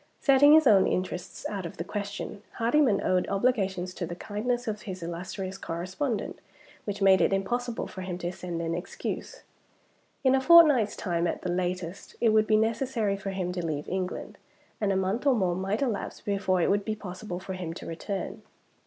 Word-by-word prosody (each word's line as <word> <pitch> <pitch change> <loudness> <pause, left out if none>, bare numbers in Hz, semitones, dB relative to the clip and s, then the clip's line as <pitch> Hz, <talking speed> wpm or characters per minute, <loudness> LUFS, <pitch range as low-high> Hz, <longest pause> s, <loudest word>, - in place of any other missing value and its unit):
Setting 280 +1 +6
his 315 -1 +7
own 205 -6 +6
interests 180 -1 -3
out 200 -3 -4
of 170 - -7
the 170 - -3
question, 200 +1 -5
Hardyman 235 -1 +2
owed 185 -1 +2
obligations 195 -4 0
to 175 - -4
the 175 - -5
kindness 240 +6 -2
of 210 -1 -3
his 185 -3 -7
illustrious 185 +3 -5
correspondent 190 - -3 0.5
which 205 -1 -3
made 190 -1 +6
it - - +3
impossible 240 +5 -1
for 190 - -8
him 185 -1 -4
to 175 -1 -3
send 175 -2 -5
an 165 0 -1
excuse. 180 - -5 0.8
In 260 -1 +5
a 265 - +3
fortnight's 295 -9 +7
time, 175 -2 -1
at - - -3
the 180 - -1
latest, 180 0 -3
it 230 - +4
would 215 0 +4
be 215 - +4
necessary 225 -2 0
for 195 0 -5
him 185 -2 -2
to 180 -1 -3
leave 150 -3 -3
England; 185 -1 -4 0.4
and 205 -2 +2
a - - +1
month 195 +8 0
or 270 - +5
more 185 -5 +1
might 195 +7 -1
elapse 235 -7 -3
before 195 -3 0
it - - +3
would 205 0 +2
be 215 +1 -2
possible 185 -2 -6
for 190 0 -6
him 180 -3 -4
to - - -8
return. 190 +4 -5
195 Hz, 190 wpm, -28 LUFS, 180-220 Hz, 0.8 s, his